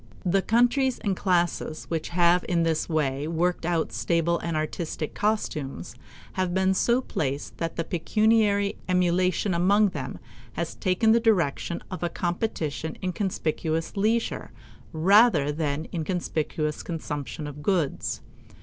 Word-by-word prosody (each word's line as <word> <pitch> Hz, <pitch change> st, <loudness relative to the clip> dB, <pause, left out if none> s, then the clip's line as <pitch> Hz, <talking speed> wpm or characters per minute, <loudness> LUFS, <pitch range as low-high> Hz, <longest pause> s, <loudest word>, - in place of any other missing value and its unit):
The 190 Hz, +2 st, +3 dB
countries 245 Hz, +4 st, +2 dB
and 200 Hz, -2 st, -1 dB
classes 175 Hz, -4 st, 0 dB
which 160 Hz, -2 st, -2 dB
have 175 Hz, 0 st, +3 dB
in 170 Hz, -2 st, +2 dB
this 165 Hz, 0 st, 0 dB
way 145 Hz, -2 st, 0 dB
worked 170 Hz, +1 st, 0 dB
out 170 Hz, -2 st, 0 dB
stable 170 Hz, 0 st, +1 dB
and 170 Hz, -2 st, -2 dB
artistic 155 Hz, 0 st, -3 dB
costumes 155 Hz, -, -2 dB, 0.4 s
have 185 Hz, -1 st, -1 dB
been 190 Hz, 0 st, +3 dB
so 235 Hz, +6 st, +2 dB
placed 140 Hz, -, -3 dB
that 165 Hz, -1 st, -2 dB
the 165 Hz, -, -1 dB
pecuniary 205 Hz, +4 st, +2 dB
emulation 180 Hz, +2 st, +2 dB
among 200 Hz, +4 st, +4 dB
them -, -, -5 dB, 0.4 s
has -, -, -3 dB
taken 200 Hz, +3 st, +2 dB
the 230 Hz, -, +5 dB
direction 175 Hz, -, +1 dB
of 185 Hz, -, -5 dB
a 175 Hz, -, 0 dB
competition 170 Hz, -4 st, -3 dB
in 185 Hz, -1 st, -1 dB
conspicuous 165 Hz, -4 st, -2 dB
leisure 220 Hz, +3 st, 0 dB, 0.4 s
rather 175 Hz, -2 st, +5 dB
than 150 Hz, 0 st, -2 dB
in 165 Hz, -3 st, -2 dB
conspicuous 155 Hz, -3 st, -2 dB
consumption 150 Hz, -2 st, -5 dB
of 145 Hz, 0 st, -7 dB
goods. 170 Hz, -4 st, -1 dB
175 Hz, 135 wpm, -26 LUFS, 160-195 Hz, 0.4 s, the